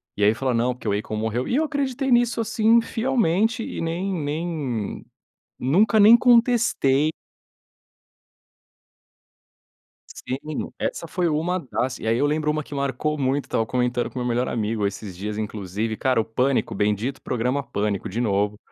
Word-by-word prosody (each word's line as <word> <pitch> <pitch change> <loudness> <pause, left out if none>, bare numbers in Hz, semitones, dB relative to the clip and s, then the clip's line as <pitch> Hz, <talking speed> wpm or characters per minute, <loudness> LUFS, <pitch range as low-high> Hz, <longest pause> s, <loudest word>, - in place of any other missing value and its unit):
E 105 - -1
aí 105 +2 +5
falou: 130 +2 -1
"Não, 120 +2 +1
porque 120 - -9
o 100 0 +1
Akon 110 +1 -5
morreu", 110 +3 -2
e 245 - 0
eu 310 - +3
acreditei 275 -3 -1
nisso, 240 -1 +3
assim, 225 +1 +3
fielmente 225 -2 +1
e - - -5
nem 175 +4 -2
nem 150 - -3 0.6
nunca 195 - +3
nem 215 +3 +9
contestei. 235 - +3 3.0
Sim, 130 - -5 0.4
essa 170 - -3
foi 175 +1 0
uma 165 +4 0
das, 130 -4 -3
e - - -7
aí 115 +1 +2
eu 145 - +2
lembro 150 +1 0
uma 155 0 -1
que 145 - -10
marcou 140 +2 -1
muito, 135 +1 0
estava 115 - 0
comentando 125 +1 0
com - - -8
meu 125 - -2
melhor 120 +1 0
amigo 110 -2 -1
esses 100 -2 -6
dias 105 +3 -4
inclusive, 105 +1 -3
cara, 130 -1 +1
o - - -1
Pânico, 125 +4 0
bendito 105 +6 -1
programa 125 +3 -1
Pânico, 100 -5 -2
de 110 +5 -3
novo, 105 -2 0
135 Hz, 160 wpm, -23 LUFS, 110-180 Hz, 3.0 s, nem